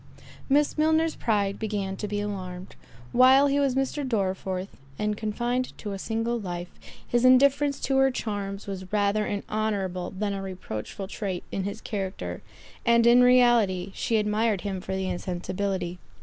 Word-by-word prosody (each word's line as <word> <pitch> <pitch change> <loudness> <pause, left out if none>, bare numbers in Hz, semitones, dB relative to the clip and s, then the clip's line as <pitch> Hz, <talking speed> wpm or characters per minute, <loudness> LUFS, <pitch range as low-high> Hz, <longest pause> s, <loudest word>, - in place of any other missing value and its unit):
Miss 290 +2 +2
Milner's 315 +1 +3
pride 200 -3 0
began 200 -3 -2
to 210 - -3
be 205 0 -2
alarmed. 185 -3 -6 0.4
While 260 +3 +6
he 285 0 +2
was 275 -3 +1
Mr. 270 +2 -1
Dorriforth, 190 -5 -2 0.2
and 210 0 -1
confined 240 +4 -2
to 210 - -6
a 195 - -5
single 225 +3 -1
life, 175 -3 -5 0.4
his 240 0 +1
indifference 280 +2 +5
to 270 - +1
her 270 0 +5
charms 205 -5 -4
was 190 -2 -6
rather 210 0 +1
an 205 -1 -3
honourable 195 -4 -2
than 200 +1 -3
a 195 - -4
reproachful 190 - -6
trait 190 -3 -4
in 190 - -2
his 200 +2 -5
character, 195 -2 -4 0.4
and 235 0 +4
in 240 +1 +7
reality, 240 -7 +4
she 225 - 0
admired 210 -1 +1
him 195 -2 -4
for 190 - -4
the 190 0 -2
insensibility. 180 0 -3
210 Hz, 160 wpm, -26 LUFS, 190-240 Hz, 0.4 s, in